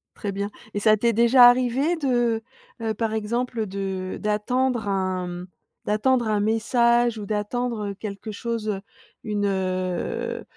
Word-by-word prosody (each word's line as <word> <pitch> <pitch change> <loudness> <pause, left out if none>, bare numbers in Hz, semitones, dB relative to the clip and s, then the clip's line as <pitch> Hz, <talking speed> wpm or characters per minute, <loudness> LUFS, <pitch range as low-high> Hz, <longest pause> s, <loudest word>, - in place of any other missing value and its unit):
Très 205 - -4
bien 200 +1 -3 0.2
et 205 - -1
ça 215 +1 +5
t'est 235 +3 +2
déjà 240 +2 +7
arrivé 255 +7 +1
de, 295 -4 -2
heu, 240 -3 +1 0.4
heu, 220 -1 -1
par 220 +1 -2
exemple 225 +1 -2
de 190 -1 -4
d'attendre 235 +2 0
un 185 -2 -1
m 175 0 -6 0.4
d'attendre 235 +2 +2
un 210 -1 +2
message 235 +2 +2
ou 205 - -5
d'attendre, 215 +1 -2
heu, - - -4
quelque 205 +1 -6
chose, 230 0 -3
heu, 195 -2 -2 0.4
une, 210 -1 -1
heu, 185 -2 -2
215 Hz, 155 wpm, -24 LUFS, 200-240 Hz, 0.4 s, déjà